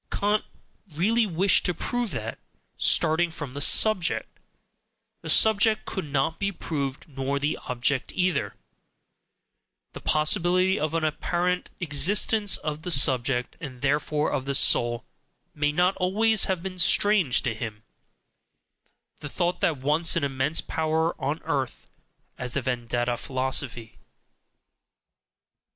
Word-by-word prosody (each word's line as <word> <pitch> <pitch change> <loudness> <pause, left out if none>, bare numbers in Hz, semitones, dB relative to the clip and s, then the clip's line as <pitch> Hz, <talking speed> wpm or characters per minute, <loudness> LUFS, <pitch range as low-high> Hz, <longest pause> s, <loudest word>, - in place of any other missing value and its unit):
KANT 210 +1 0 0.5
really 220 +7 +2
wished 190 +2 +3
to 180 - -1
prove 245 +6 -2
that, - - -6 0.4
starting 170 +1 +3
from 145 -5 -8
the 145 - -4
subject, 190 +1 +3 0.8
the - - -7
subject 220 0 +4
could 190 - -5
not 145 +3 -1
be 200 0 -1
proved 140 -7 -5
nor 135 -1 -3
the 145 +2 -1
object 125 +2 -1
either: 185 0 -1 1.4
the - - -8
possibility 180 +4 +2
of 155 +2 -2
an 165 - -1
APPARENT 175 +3 -1
EXISTENCE 190 +7 +2
of 150 0 -5
the 180 - -5
subject, 130 -4 +1
and 130 -5 -9
therefore 150 +2 0
of 130 - -2
"the 140 0 -1
soul," 120 -2 +2 0.5
may 150 0 0
not 180 +5 +1
always 210 +4 +2
have 185 -3 -2
been 185 -1 -6
strange 180 - +3
to 120 - -1
him, 110 -1 -7 1.4
the 145 - -7
thought 175 +2 -2
which 160 - +1
once 155 +4 +2
had 170 - 0
an 140 - -1
immense 135 +4 0
power 160 +1 -1
on 145 +4 -2
earth 140 -6 -3 0.5
as 125 -1 -3
the 140 - -1
Vedanta 120 -1 -2
philosophy. 130 -3 -2
155 Hz, 130 wpm, -25 LUFS, 135-180 Hz, 1.4 s, subject